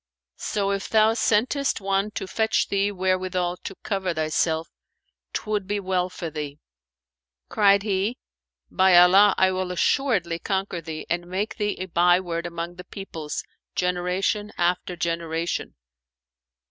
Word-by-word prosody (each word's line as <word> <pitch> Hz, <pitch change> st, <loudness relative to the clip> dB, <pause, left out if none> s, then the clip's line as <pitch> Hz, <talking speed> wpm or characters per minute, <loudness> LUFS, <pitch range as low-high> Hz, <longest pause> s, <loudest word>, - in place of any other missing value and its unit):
So, 200 Hz, -2 st, -1 dB
if 195 Hz, 0 st, -3 dB
thou 220 Hz, 0 st, +4 dB
sentest 245 Hz, +5 st, +1 dB
one 195 Hz, +1 st, 0 dB
to -, -, -3 dB
fetch 220 Hz, +3 st, 0 dB
thee 200 Hz, +1 st, +1 dB
wherewithal 185 Hz, -2 st, -1 dB
to 195 Hz, -, -8 dB
cover 190 Hz, -4 st, -1 dB
thyself, 160 Hz, +1 st, 0 dB, 0.6 s
'twould 210 Hz, -3 st, -2 dB
be 205 Hz, +1 st, -1 dB
well 185 Hz, -2 st, 0 dB
for 170 Hz, -3 st, -6 dB
thee." 150 Hz, -2 st, -5 dB, 0.9 s
Cried 200 Hz, -1 st, +4 dB
he, 205 Hz, +3 st, 0 dB, 0.5 s
"By 190 Hz, -2 st, +5 dB
Allah, 190 Hz, +3 st, +7 dB
I 190 Hz, 0 st, +4 dB
will 185 Hz, -1 st, -2 dB
assuredly 180 Hz, -, +1 dB
conquer 190 Hz, -3 st, -2 dB
thee 155 Hz, -1 st, -6 dB
and 175 Hz, +1 st, -2 dB
make 195 Hz, +5 st, -3 dB
thee 210 Hz, -2 st, -1 dB
a 185 Hz, -, -2 dB
byword 175 Hz, -1 st, +2 dB
among 170 Hz, +1 st, -6 dB
the 180 Hz, -, -8 dB
peoples, 165 Hz, -6 st, -6 dB, 0.3 s
generation 180 Hz, +4 st, 0 dB
after 180 Hz, +1 st, 0 dB
generation!" 165 Hz, 0 st, -2 dB
185 Hz, 135 wpm, -24 LUFS, 175-200 Hz, 0.9 s, Allah